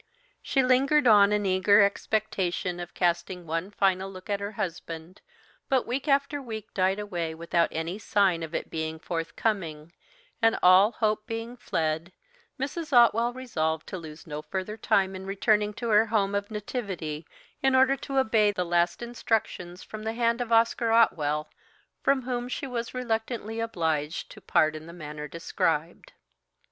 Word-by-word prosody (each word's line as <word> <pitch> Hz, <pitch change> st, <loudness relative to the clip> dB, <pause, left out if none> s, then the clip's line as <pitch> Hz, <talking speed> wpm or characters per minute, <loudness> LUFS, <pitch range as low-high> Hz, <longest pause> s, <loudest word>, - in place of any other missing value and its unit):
She 270 Hz, -, +1 dB
lingered 270 Hz, +4 st, +3 dB
on 205 Hz, -3 st, +7 dB
in 210 Hz, -1 st, +1 dB
eager 195 Hz, +2 st, +5 dB
expectation 190 Hz, -3 st, -1 dB
of 175 Hz, 0 st, -8 dB
casting 175 Hz, 0 st, 0 dB
one 165 Hz, +4 st, -2 dB
final 195 Hz, -1 st, +1 dB
look 185 Hz, +1 st, -8 dB
at 200 Hz, -, 0 dB
her 200 Hz, +1 st, -5 dB
husband, 170 Hz, -1 st, -6 dB, 0.5 s
but 260 Hz, -2 st, +2 dB
week 260 Hz, +5 st, -3 dB
after 280 Hz, +1 st, +1 dB
week 220 Hz, -4 st, -7 dB
died 190 Hz, +1 st, +2 dB
away 175 Hz, -6 st, -3 dB
without 170 Hz, +1 st, +1 dB
any 165 Hz, +5 st, -3 dB
sign 195 Hz, -6 st, +2 dB
of 160 Hz, 0 st, -5 dB
it -, -, -4 dB
being 160 Hz, 0 st, -3 dB
forthcoming, 165 Hz, -1 st, -3 dB, 0.5 s
and 225 Hz, 0 st, +4 dB
all 190 Hz, +5 st, +7 dB
hope 215 Hz, -1 st, 0 dB
being 225 Hz, +2 st, -5 dB
fled, 165 Hz, -5 st, -2 dB, 0.5 s
Mrs. 300 Hz, +4 st, -4 dB
Otwell 235 Hz, -1 st, +5 dB
resolved 160 Hz, -12 st, -2 dB
to 190 Hz, -, -4 dB
lose 155 Hz, -1 st, -10 dB
no 150 Hz, -1 st, -5 dB
further 190 Hz, +7 st, -4 dB
time 195 Hz, -3 st, +1 dB
in 190 Hz, 0 st, -7 dB
returning 210 Hz, +1 st, +2 dB
to 235 Hz, -1 st, -4 dB
her 215 Hz, +1 st, +5 dB
home 205 Hz, -3 st, +1 dB
of 200 Hz, 0 st, -2 dB
nativity, 190 Hz, -, -5 dB, 0.3 s
in 265 Hz, -1 st, +3 dB
order 265 Hz, +1 st, +5 dB
to 270 Hz, +1 st, -4 dB
obey 220 Hz, -5 st, +4 dB
the 180 Hz, -3 st, -2 dB
last 175 Hz, +4 st, +1 dB
instructions 220 Hz, -6 st, -2 dB
from 215 Hz, -, -8 dB
the 220 Hz, +1 st, -3 dB
hand 235 Hz, +1 st, +1 dB
of 235 Hz, -1 st, -4 dB
Oscar 230 Hz, 0 st, +3 dB
Otwell, 150 Hz, -10 st, +3 dB, 0.5 s
from 275 Hz, -2 st, +2 dB
whom 245 Hz, -1 st, -3 dB
she 275 Hz, -, -3 dB
was 240 Hz, -2 st, -4 dB
reluctantly 225 Hz, -2 st, -2 dB
obliged 160 Hz, -8 st, -2 dB
to -, -, -12 dB
part 155 Hz, 0 st, +2 dB
in 155 Hz, +1 st, -8 dB
the 170 Hz, -, -10 dB
manner 150 Hz, -3 st, -7 dB
described. 165 Hz, 0 st, -2 dB
200 Hz, 160 wpm, -27 LUFS, 170-230 Hz, 0.5 s, on